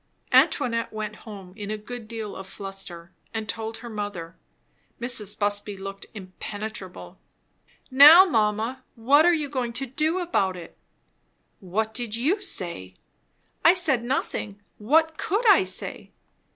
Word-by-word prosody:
Antoinette 230 -1 +2
went 215 -1 -5
home 195 -4 -10
in 205 -1 -7
a 215 - -3
good 225 +1 -9
deal 220 -2 -6
of 190 - -9
a - - -13
fluster, 195 -4 -8 0.2
and 220 -1 -3
told 225 +1 -4
her 240 - -10
mother. 205 -6 -6 0.6
Mrs. 225 -4 0
Busby 205 -1 -1
looked 195 +1 -8
impenetrable. 190 - -8 0.7
"Now 300 +8 +10
mamma, 225 - 0
what 280 +8 +4
are 350 - +5
you 300 -2 -3
going 255 -4 -3
to 270 +3 -3
do 310 +7 -1
about 200 - 0
it?" 170 -2 -11 0.8
"What 215 +4 -2
did 235 -2 -3
you 315 - 0
say?" 170 - -3 0.7
"I 340 - +7
said 305 -10 +2
nothing. 230 -5 -3 0.2
What 315 +8 +2
could 430 +6 0
I 390 -2 +7
say?" - - -5
220 Hz, 140 wpm, -25 LUFS, 200-270 Hz, 0.8 s, Now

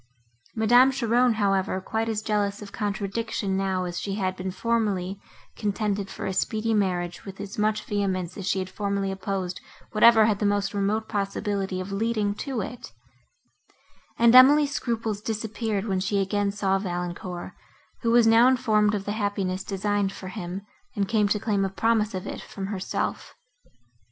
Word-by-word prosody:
Madame 245 +4 +6
Cheron, 245 -1 +2
however, 195 -2 +1
quite 220 +4 -2
as 220 -1 -2
jealous 205 -2 0
of 205 -1 -9
contradiction 205 0 -2
now, 190 -1 0
as 175 -1 -4
she 195 -1 -3
had 190 -2 -1
been 185 0 -4
formerly, 200 -2 -1 0.4
contended 205 -1 -2
for - - -6
a - - -2
speedy 220 +3 0
marriage 180 -4 -1
with 195 -1 -9
as 205 +1 -6
much 215 0 +1
vehemence 185 -4 -2
as 195 -2 -6
she 190 - +1
had 185 -1 -2
formerly 200 0 -2
opposed 190 -1 -3 0.3
whatever 220 0 +6
had 210 -2 +1
the - - -2
most 205 -1 0
remote 205 +2 0
possibility 200 -2 -2
of 185 +2 -5
leading 215 0 0
to 250 +2 -3
it; 240 +5 -7 1.3
and 235 0 +5
Emily's 280 +3 +8
scruples 225 -5 -2
disappeared, 215 -1 -2
when 190 -4 0
she 195 +2 0
again 200 +1 0
saw 195 -1 0
Valancourt, 175 -1 -5 0.5
who 230 - 0
was 235 0 +5
now 225 +2 +6
informed 215 -5 +3
of 200 -1 -4
the 205 - -2
happiness, 200 -3 -2
designed 200 0 -1
for 190 -1 -8
him, 185 -1 -6 0.3
and 200 -1 0
came 210 -1 +2
to 210 +1 +1
claim 205 -2 0
a 195 - 0
promise 215 +1 +1
of 185 - -4
it - - -6
from 195 - -7
herself. 195 -1 -3
205 Hz, 165 wpm, -26 LUFS, 195-220 Hz, 1.3 s, Emily's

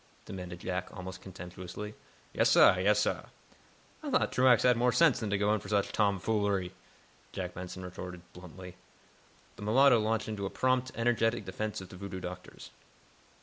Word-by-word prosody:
demanded 90 -2 -7
Jack, 90 -1 -3
almost 95 0 -7
contemptuously. 95 +2 -8 0.4
"Yes, - - +3
sah; - - +7
yes, - - +3
sah." - - -1 0.8
"I 305 - -5
thought 255 -1 +2
Truax 125 -2 +4
had 125 -1 +5
more 125 +2 +2
sense 165 0 +4
than 110 - -3
to 100 - +1
go 105 +1 +2
in 110 - +1
for - - -10
such 100 -2 +1
tomfoolery," 100 -2 0 0.6
Jack 90 -1 -4
Benson 90 +1 -7
retorted, 90 -1 -8
bluntly. 90 0 -11 0.8
The - - -11
mulatto 120 +4 +5
launched 110 +1 0
into 105 -3 -3
a - - -5
prompt, 130 +2 0
energetic 115 -1 +1
defense 105 +2 -4
of 95 - -10
the 90 - -11
voodoo 95 0 -6
doctors. 90 0 -9
100 Hz, 165 wpm, -31 LUFS, 90-115 Hz, 0.8 s, sah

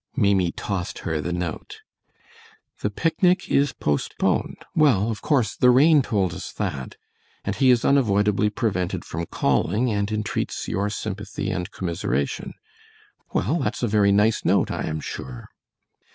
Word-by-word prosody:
Maimie 95 -4 +2
tossed 95 -1 -4
her 80 -2 -1
the 90 - -3
note. 90 -2 -5 1.0
"The - - -1
picnic 175 - +1
is 140 -1 +3
postponed. 75 -1 -1 0.2
Well, 115 -9 +3
of 110 - -6
course 130 -7 +1
the 125 - +4
rain 145 +4 +6
told 100 -9 0
us - - -7
that; 65 -2 -4 0.5
and - - -1
he 130 -1 +3
is 125 -2 +4
unavoidably 105 -6 +3
prevented 95 -5 -2
from 85 +1 -5
calling, 105 - +1
and 100 0 -1
entreats 110 0 -2
your 100 +3 -1
sympathy 105 -1 -4
and 90 -2 -3
commiseration. 80 -6 -3 0.8
Well, 145 - 0
that's 130 - -2
a - - +3
very 105 -2 +3
nice 105 +2 +3
note, - - +2
I - - -3
am 80 -1 -3
sure." - - -7
105 Hz, 145 wpm, -24 LUFS, 90-125 Hz, 1.0 s, rain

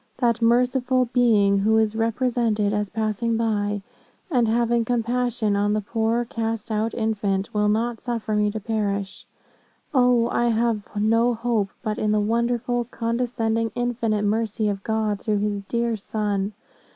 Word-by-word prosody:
That 235 -2 +1
merciful 250 +2 +2
Being, 210 -5 +4
who 220 +3 +3
is 220 -1 +2
represented 225 -2 0
as 210 -1 -1
passing 225 +2 -1
by, 205 -3 -1 0.5
and 245 -5 +3
having 235 +1 +2
compassion 240 -2 0
on 205 +1 +1
the 215 - 0
poor 225 +2 0
cast 225 -2 -3
out 215 +1 -1
infant, 205 -3 -1
will 210 0 +2
not 225 +2 0
suffer 230 -3 -2
me 210 0 +2
to 215 +1 -4
perish. 200 -2 -3 0.7
O, 245 -3 +4
I 240 - +1
have 230 -2 +1
no 230 +3 +2
hope 225 -3 0
but 215 -2 -2
in 215 - +1
the 215 - +2
wonderful, 235 +2 0
condescending, 230 -1 -1
infinite 235 -3 -1
mercy 215 0 0
of 195 -1 -4
God, 220 -2 -1
through 210 0 0
his 205 0 -1
dear 235 -1 0
Son. 205 -1 -2
225 Hz, 150 wpm, -23 LUFS, 210-235 Hz, 0.7 s, Being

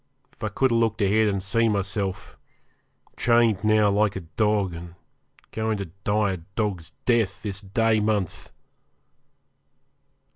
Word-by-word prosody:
If - - -14
I 110 - 0
could 130 +5 +1
have 115 - +3
looked 115 -1 0
ahead, 110 +2 +3
and 100 -2 -1
seen 115 +3 +2
myself 95 -2 -3 0.8
chained 115 -4 +3
now 110 -1 +4
like 105 0 +2
a 95 - -4
dog, 100 +2 0
and 85 +1 -9 0.6
going 110 -1 -1
to 100 -5 -6
die 105 -1 +1
a 95 - -3 0.2
dog's 100 -7 -2 0.2
death 115 -5 +1
this 100 -2 -4
day 110 +2 +1
month! 105 -4 -2
105 Hz, 140 wpm, -25 LUFS, 95-110 Hz, 0.8 s, now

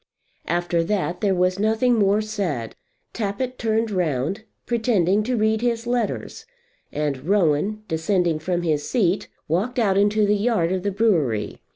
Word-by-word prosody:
After 175 0 0
that 180 -2 -1
there 200 -3 +2
was 185 +1 +1
nothing 220 +4 +2
more 205 -2 +3
said. 180 - -3 0.4
Tappitt 235 +4 -3
turned 225 -1 0
round, 175 +2 -1 0.2
pretending 215 -5 +2
to 245 +3 -1
read 220 0 +1
his 235 -1 -1
letters, 240 -2 -3 0.4
and 145 -2 -3
Rowan 200 +2 +1
descending 165 0 0
from 175 +2 -2
his 150 -3 -1
seat 200 -7 +1 0.2
walked 195 +11 -1
out 200 -5 +3
into 205 +1 +3
the 205 +1 +3
yard 205 -5 +1
of 185 -1 -1
the 200 - -1
brewery. 165 - 0
200 Hz, 150 wpm, -23 LUFS, 170-220 Hz, 0.4 s, more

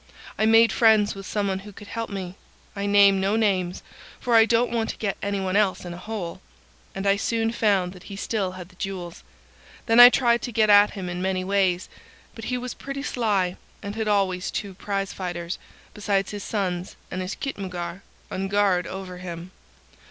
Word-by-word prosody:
I 215 - +2
made 225 0 +6
friends 215 -1 +4
with 195 -1 -9
someone 200 -2 -1
who 205 +2 -11
could 205 +1 -13
help 230 -1 -4
me,—I 200 +1 -7
name 200 -1 +5
no 195 +2 +1
names, 190 -5 0 0.4
for 245 - -1
I 225 -1 +8
don't 235 +1 +2
want 230 -1 -1
to - - -5
get 200 -3 -2
any 200 0 -1
one 190 0 -2
else 200 -3 +2
in 175 - -6
a 175 - -9
hole,—and 170 - -8
I 200 0 +4
soon 225 +1 0
found 200 -6 +1
that 180 - -14
he 200 - -6
still 195 -2 -2
had 180 -1 -9
the 185 - -20
jewels. 185 -4 -5 0.6
Then 225 +1 +4
I 245 0 +12
tried 240 -2 +2
to 245 - -4
get 215 -1 +3
at 205 0 +6
him 185 -2 -4
in 180 0 -4
many 185 0 -1
ways; 185 -2 +1 0.5
but 225 - -9
he 250 +1 -1
was 250 0 -5
pretty 275 0 -6
sly, 200 -9 0 0.3
and 200 +1 -5
had 220 -1 -2
always 195 -3 +1
two 200 -2 -4
prize 195 +1 -3
fighters, 175 -2 -4 0.3
besides 200 -2 -1
his 205 -2 -6
sons 185 -4 -3 0.2
and 185 - -3
his 185 +2 -4
khitmutgar, 185 -7 -5 0.3
on 190 +1 -2
guard 195 -3 +2
over 185 -2 -7
him. 175 0 -7
195 Hz, 190 wpm, -24 LUFS, 185-215 Hz, 0.6 s, I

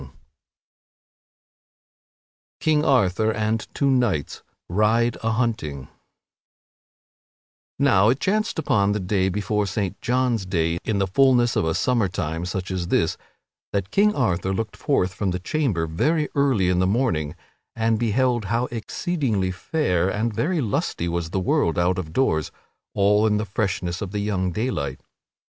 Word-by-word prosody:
[Sidenote: - - -13 2.4
King 155 -1 +2
Arthur 110 -4 +3
and 110 0 -1
two 140 -1 +2
knights 115 - 0 0.3
ride 110 +5 +2
a 115 - 0
hunting] 110 - -2 1.9
Now 110 -7 +4
it 130 +3 +1
chanced 215 +3 0
upon 110 -10 +2
the 105 - -1
day 95 0 0
before 105 +1 -1
Saint 100 0 -3
John's 120 -5 0
day 85 -2 0
in 110 - -1
the 100 - +2
fulness 120 +3 +3
of - - +1
a 80 0 0
summer 120 -5 +1
time 85 -2 -3
such 95 0 -4
as 90 -2 -2
this, - - +1 0.6
that 100 -1 -2
King 210 +1 +3
Arthur 95 -7 0
looked 110 0 -3
forth 90 0 0
from 100 -2 -1
his 90 0 -3
chamber 110 - 0
very 150 - 0
early 135 -10 +2
in 90 -1 +2
the 95 - +2
morning 90 - 0 0.4
and 115 -1 +1
beheld 120 0 +1
how 115 +5 0
exceedingly 115 - -1
fair 95 - 0
and 110 +3 -1
very 160 - 0
lusty 100 -6 -1
was 85 -1 -2
the 95 - -1
world 85 -3 +1
out 90 +1 +1
of 80 -4 -6
doors 80 - +1 0.4
all 105 +2 +3
in 105 -1 +2
the 105 - -2
freshness 95 -3 -2
of 100 - -3
the 105 +2 -3
young 95 -3 -1
daylight. 75 - -2
105 Hz, 150 wpm, -23 LUFS, 90-120 Hz, 2.4 s, Now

